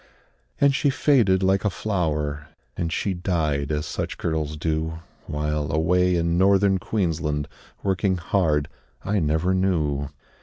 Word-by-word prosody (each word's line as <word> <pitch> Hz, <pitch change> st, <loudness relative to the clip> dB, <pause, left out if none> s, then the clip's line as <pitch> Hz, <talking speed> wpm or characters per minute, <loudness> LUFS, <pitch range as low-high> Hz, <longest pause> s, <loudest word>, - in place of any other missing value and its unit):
And 140 Hz, -1 st, +4 dB
she 140 Hz, +1 st, +2 dB
faded 120 Hz, -8 st, +3 dB
like 95 Hz, +1 st, +2 dB
a 105 Hz, -, +2 dB
flower, 75 Hz, -8 st, -2 dB, 0.3 s
And 85 Hz, -1 st, -2 dB
she 95 Hz, +4 st, -1 dB
died, 80 Hz, -6 st, -1 dB
as 75 Hz, 0 st, -1 dB
such -, -, -4 dB
girls 75 Hz, -2 st, -2 dB
do, 80 Hz, +1 st, -2 dB, 0.3 s
While, 75 Hz, 0 st, -2 dB
away 90 Hz, +3 st, +2 dB
in 85 Hz, 0 st, +1 dB
Northern 95 Hz, 0 st, +4 dB
Queensland, 80 Hz, -8 st, -1 dB, 0.4 s
Working 95 Hz, -1 st, +1 dB
hard, 80 Hz, -4 st, +1 dB, 0.4 s
I 100 Hz, +1 st, +1 dB
never 80 Hz, +3 st, +1 dB
knew. 75 Hz, -7 st, 0 dB
85 Hz, 130 wpm, -24 LUFS, 75-95 Hz, 0.4 s, And